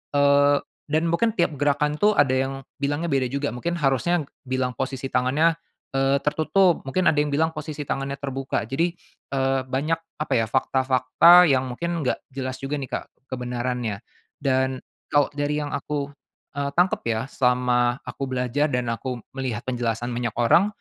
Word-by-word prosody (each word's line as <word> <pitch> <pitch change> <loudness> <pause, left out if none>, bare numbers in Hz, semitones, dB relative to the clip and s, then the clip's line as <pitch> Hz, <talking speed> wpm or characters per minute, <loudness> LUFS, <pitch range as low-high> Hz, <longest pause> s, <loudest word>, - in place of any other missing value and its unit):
eee, 140 0 +5 0.3
dan 155 +2 +1
mungkin 225 +7 +2
tiap 170 -5 +2
gerakan 145 +1 +1
tuh 210 0 +4
ada 145 -6 +4
yang 135 +1 0 0.3
bilangnya 145 +4 -1
beda 135 -2 +2
juga 140 +1 -2
mungkin 170 +9 -3
harusnya 150 +4 +1 0.2
bilang 130 -1 -2
posisi 135 +1 -3
tangannya, 135 +6 +2 0.4
eee, 135 +1 +3
tertutup, 160 +5 +2
mungkin 155 +7 -1
ada - - +4
yang 150 - -3
bilang 160 +3 +1
posisi 150 -1 -6
tangannya 135 0 -3
terbuka. 135 -4 -3
Jadi, 165 +8 0 0.4
eee, 135 -1 +1
banyak 140 +6 -1 0.2
apa 150 - -1
ya 115 - +3
fakta-fakta 130 +7 +5
yang 130 -3 +1
mungkin 170 +5 -3
nggak 125 - -2
jelas 130 -1 -4
juga 135 +2 -3
nih, 135 -3 -5
Kak, - - -3 0.3
kebenarannya. 125 -3 -3 0.4
Dan 130 -1 +1 0.3
kalau 145 -2 +2
dari 145 0 -1
yang 145 - -5
aku, 145 -1 -3 0.5
eee, 140 - 0
tangkep 180 +2 +2
ya 110 -1 0
selama 125 -1 +2
aku 135 - -5
belajar 130 +3 0
dan 125 -4 -1
aku 120 0 -4
melihat 130 -4 -4
penjelasan 120 -1 -2
banyak 120 -1 -3
orang, 120 - +4
135 Hz, 160 wpm, -24 LUFS, 125-150 Hz, 0.5 s, eee